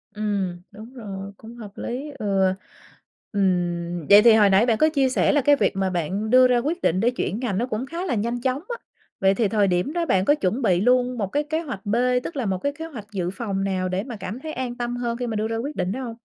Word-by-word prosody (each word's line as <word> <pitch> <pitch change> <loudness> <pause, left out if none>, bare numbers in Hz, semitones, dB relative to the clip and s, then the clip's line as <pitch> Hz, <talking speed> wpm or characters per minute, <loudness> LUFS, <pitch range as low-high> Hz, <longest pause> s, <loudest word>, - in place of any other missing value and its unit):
Ừm, 200 -4 -2
đúng 220 +4 -12
rồi, 200 -5 -7
cũng 230 +2 -12
hợp 210 -4 -9
lý, 270 +5 -5
ừ. 195 -2 +1 0.8
Ừm, 175 -4 -1
vậy 205 +1 +9
thì 235 0 +7
hồi 210 -2 +5
nãy 195 +4 +4
bạn 230 -3 +2
có 310 - +4
chia 275 -4 +2
sẻ 260 - +2
là 290 -1 +3
cái 290 +2 +5
việc 275 - 0
mà 195 -1 0
bạn 185 +5 -2
đưa 255 +2 +7
ra 250 -1 +3
quyết 310 +9 -2
định 180 +3 +1
để 235 - +3
chuyển 235 -3 -3
ngành 230 -7 -2
nó 235 - 0
cũng 245 +1 -3
khá 335 +6 -5
là 260 - -1
nhanh 235 +3 -2
chóng 260 +2 -1
á. 475 - -3 0.4
Vậy 195 0 +4
thì 230 - +2
thời 205 -1 +2
điểm 180 +10 0
đó 340 -1 0
bạn 190 - +2
có 290 - +4
chuẩn 230 -1 -1
bị 185 -6 +2
luôn 250 +1 +2
một 200 -3 -1
cái 290 +9 -1
kế 315 +2 -2
hoạch 215 - -7
B, 205 +3 0 0.3
tức 335 - -6
là 255 -5 -2
một 190 -1 0
cái 285 +9 -2
kế 325 - -4
hoạch 235 -10 -9
dự 180 -4 -2
phòng 195 0 -3
nào 185 -1 -1
để 185 +2 -1
mà 245 -1 -7
cảm 210 +2 -6
thấy 310 +3 -6
an 250 -2 -4
tâm 240 0 -3
hơn 235 -1 -2
khi 245 -1 -3
mà 220 - -3
đưa 215 +1 -1
ra 225 0 -2
quyết 280 +6 -4
định 185 0 -1
đó 260 +4 -4
hông? 230 -2 -6
225 Hz, 275 wpm, -23 LUFS, 195-255 Hz, 0.8 s, vậy